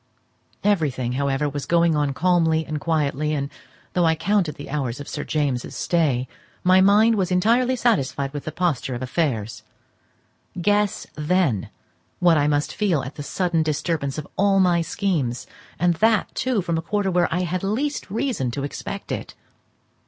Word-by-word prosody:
Everything, 150 -12 +1
however, 140 +2 0
was 145 0 -4
going 170 -1 +3
on 145 -2 +1
calmly 160 0 +2
and 150 -1 -4
quietly; 150 -2 0
and, 140 -1 -3 0.4
though 180 - +2
I 160 -1 +3
counted 195 -2 0
the 145 - -9
hours 130 -4 -2
of 145 - -8
Sir 145 - -4
James's 140 -5 -2
stay, 140 -7 +1 0.4
my 185 +1 +5
mind 210 +4 +5
was 195 -4 0
entirely 235 +8 +3
satisfied 140 - 0
with 145 - -6
the 155 - -3
posture 155 -8 -1
of 120 - -5
affairs. 125 -6 -2 1.0
Guess, 205 +2 +1
then, 150 - 0 0.5
what 175 -2 +4
I 145 - +2
must 145 0 0
feel 185 -9 +1
at 130 +3 -7
the - - -8
sudden 170 +2 0
disturbance 155 -2 -1
of 155 - -5
all 195 0 +3
my 175 -2 +3
schemes; 165 - -1 0.3
and 175 0 +3
that, 220 +4 +2
too, 245 -6 0
from 170 -2 -1
a - - -3
quarter 200 +3 -1
where 175 -1 +2
I 180 - 0
had 180 0 -2
least 245 +9 -2
reason 215 - -1
to 135 +4 -4
expect 140 - -6
it. - - -5
165 Hz, 165 wpm, -23 LUFS, 140-190 Hz, 1.0 s, my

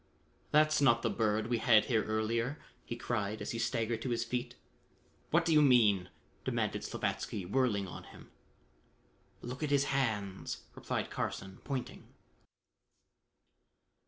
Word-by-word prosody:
"That's 155 0 +4
not 120 -4 +4
the 115 - +1
Bird 110 0 +1
we 120 0 0
had 110 -2 +5
here 115 -4 +2
earlier," 115 +5 -1 0.3
he 120 - -5
cried 110 -3 -2
as - - -4
he 115 - -3
staggered 115 0 -1
to 130 - -3
his 120 -1 0
feet. 120 +1 -3 0.7
"What 170 +1 +3
do 165 - +3
you 150 - +7
mean?" 105 -10 +4 0.3
demanded - - -1
Slavatsky 95 - -3
whirling 105 -2 +1
on - - -9
him. - - -14 1.1
"Look 125 +4 -6
at 150 - -1
his 140 -1 +4
hands!" 105 -8 -2
replied - - -3
Carson 95 0 -4
pointing. 135 -4 -5
115 Hz, 135 wpm, -33 LUFS, 110-130 Hz, 1.1 s, you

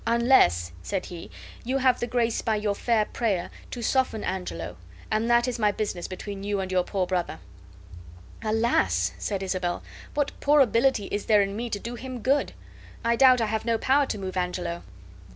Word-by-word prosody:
"Unless," 230 - +4
said 190 - -3
he, 170 -2 -9 0.3
"you 260 +3 0
have 260 -1 +3
the 240 - -2
grace 235 -1 0
by 220 - 0
your 210 -1 0
fair 220 +1 +1
prayer 205 -8 -1 0.2
to 240 - -6
soften 255 -2 +1
Angelo, 90 - -4 0.4
and 220 +2 +1
that 240 +1 +4
is 250 -1 -2
my 210 -2 +3
business 200 -4 -3
between 195 +1 -7
you 205 0 -1
and 190 -1 -3
your 185 -1 +2
poor 190 0 -1
brother." 180 - -2 1.1
"Alas!" 215 - +2
said 195 -2 -2
Isabel, 185 -2 -2 0.3
"what 290 -1 +1
poor 295 +1 +4
ability 240 -3 +3
is 205 - -3
there 210 -2 +5
in 195 0 -4
me 235 +2 -3
to 210 - -2
do 235 +4 -6
him 250 0 -7
good? 275 +2 +2 0.5
I 235 0 +3
doubt 255 -1 +6
I - - +2
have 220 0 -2
no 230 0 +1
power 275 +4 +3
to - - -3
move 190 -2 -5
Angelo." 180 -1 -2
215 Hz, 190 wpm, -26 LUFS, 185-240 Hz, 1.1 s, doubt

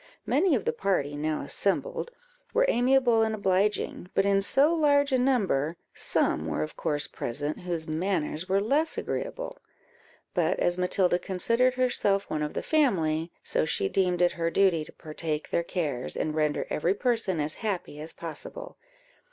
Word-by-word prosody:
Many 310 +4 +3
of 220 - -2
the - - +1
party 145 -7 0
now 155 0 -2
assembled 200 - -1 0.5
were - - +5
amiable 245 - +3
and 220 0 +1
obliging, 195 -2 0
but 195 - +3
in 200 0 +3
so 280 +10 +4
large 285 -3 +3
a 260 - +3
number, 190 - +1 0.2
some - - +1
were 75 - -1
of 75 - -7
course 145 -1 -1
present, 145 +5 -4
whose 170 -3 -3
manners 165 0 -2
were 195 +1 +3
less 280 +10 +1
agreeable: - - -4 0.7
but - - +1
as 175 - +2
Matilda 180 0 +2
considered 230 +8 +1
herself 205 -6 +1
one 155 - -1
of 150 0 -3
the - - -2
family, 170 - +1
so - - +2
she 150 -10 0
deemed 180 - +1
it 175 - +4
her 165 0 -1
duty 175 -3 +3
to - - -13
partake 155 0 -5
their - - +2
cares, 150 -8 -3
and 155 - -1
render 150 -1 0
every 175 +5 +1
person 225 -7 0
as 150 +1 -1
happy 190 -8 -3
as 155 +2 -5
possible. 170 - -7
185 Hz, 165 wpm, -27 LUFS, 155-245 Hz, 0.7 s, were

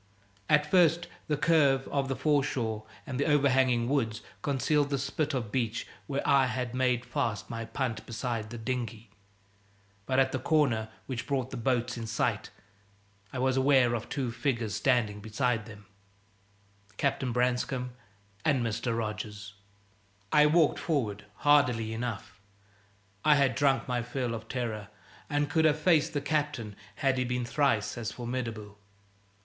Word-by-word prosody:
At 150 0 +5
first 170 +1 +4 0.2
the 150 - 0
curve 145 -4 +3
of 140 -1 0
the 135 - -1
foreshore 130 -8 0 0.2
and 130 -1 -4
the 145 - +1
overhanging 130 -5 +3
woods 115 -6 0 0.2
concealed 145 +1 +1
the 140 - 0
spit 140 +2 -1
of 115 -5 -3
beach 115 -2 -1 0.2
where 140 -1 -2
I 140 -2 +5
had 125 0 -3
made 125 -1 +1
fast 115 -7 -2
my 115 0 -4
punt 115 +1 -3
beside 115 -2 -3
the 120 - -7
dinghy; 115 -2 -4 1.0
but 130 - +1
at 130 0 +4
the 130 - -1
corner 125 -7 +2 0.2
which 125 -2 -5
brought 130 -3 -1
the - - -5
boats 125 0 0
in 115 - -5
sight 110 - -1 0.8
I - - -5
was 130 +1 +1
aware 130 -3 +4
of 115 -2 -3
two 135 -4 -2
figures 115 -3 -1
standing 110 -3 +1
beside 110 +1 -1
them 105 -2 -12 1.1
Captain 135 -2 0
Branscome 125 +1 0 0.5
and 135 -6 +2
Mr. 115 +1 -1
Rogers. 105 -2 -5 0.8
I 150 0 +6
walked 155 0 +3
forward 110 - -1 0.2
hardily 125 -7 +3
enough; 110 -4 -5 0.8
I 150 -1 +6
had 135 -3 +3
drunk 135 +1 +2
my 125 -1 0
fill 125 0 -3
of 110 -1 -6
terror, 110 -5 -3 0.4
and 145 -1 +1
could 160 +2 +2
have 150 -1 +4
faced 160 -1 +3
the 145 - -1
Captain 145 -8 -2 0.2
had 135 -2 +1
he - - +2
been 125 0 -2
thrice 120 -5 +1
as 115 - -3
formidable. 115 -4 -5
125 Hz, 150 wpm, -29 LUFS, 115-140 Hz, 1.1 s, I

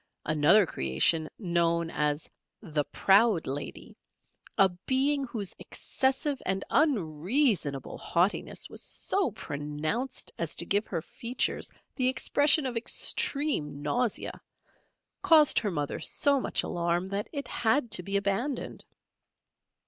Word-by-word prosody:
Another 155 +7 +4
creation 155 - 0
known 170 -3 0
as 150 0 -1 0.4
"The 150 -6 -1
Proud 200 -2 +3
Lady" 140 +2 -6 0.6
a 195 -2 +6 0.2
being 275 +1 +3
whose 210 -6 -5
excessive 270 +1 -1
and 190 0 -1
unreasonable 190 - +1
haughtiness 180 +4 -1
was - - -8
so 390 -8 -1
pronounced 155 - -4
as 170 -2 -2
to - - +2
give 205 +4 0
her 165 -4 -3
features 240 +1 -2 0.3
the 255 -2 +2
expression 290 +3 +3
of 250 -2 -3
extreme 230 - 0
nausea, 235 +8 -1 0.8
caused 310 -3 +5
her 210 - -2
mother 145 -6 -3
so 280 -1 +2
much - - -1
alarm 175 +1 -1
that 200 +2 -4
it 285 -2 -4
had 240 +1 +1
to 220 - +4
be 195 +3 -1
abandoned. 215 +7 -2
200 Hz, 120 wpm, -28 LUFS, 165-260 Hz, 0.8 s, a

